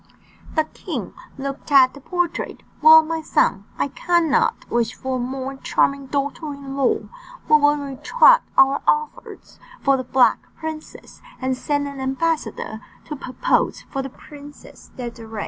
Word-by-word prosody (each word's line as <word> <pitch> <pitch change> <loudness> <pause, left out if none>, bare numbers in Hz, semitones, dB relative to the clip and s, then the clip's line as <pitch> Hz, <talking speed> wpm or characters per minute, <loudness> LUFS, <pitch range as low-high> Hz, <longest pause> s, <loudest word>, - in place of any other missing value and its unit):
The 315 - +3
king 310 - -7 0.2
looked 275 +2 -6
at 265 -2 +6
the 280 - -13
portrait. 355 +2 -3 0.2
"Well, 315 +1 +9
my 325 0 -3
son, 200 -9 +1
I - - -1
cannot 335 -1 +1
wish 235 -1 -1
for 260 -1 -3
a - - -4
more 265 +2 -4
charming 275 0 0
daughter 285 +3 -3
in 275 -1 -8
law, 275 -2 +1 0.5
we 305 - +7
will 290 0 +3
retract 295 - +3
our 270 +1 +5
offers 455 0 -2 0.2
for 275 -1 +4
the 255 - -3
Black 255 0 +3 0.2
Princess, 315 -1 -8 0.2
and 260 -1 -1
send 285 +2 -1
an 280 -1 -8
ambassador 265 -5 -2 0.2
to 300 - -6
propose 270 - -1
for 270 - -2
the 270 - -6
Princess 290 +2 -14
Désirée." 230 -3 -7
275 Hz, 145 wpm, -21 LUFS, 260-310 Hz, 0.5 s, Well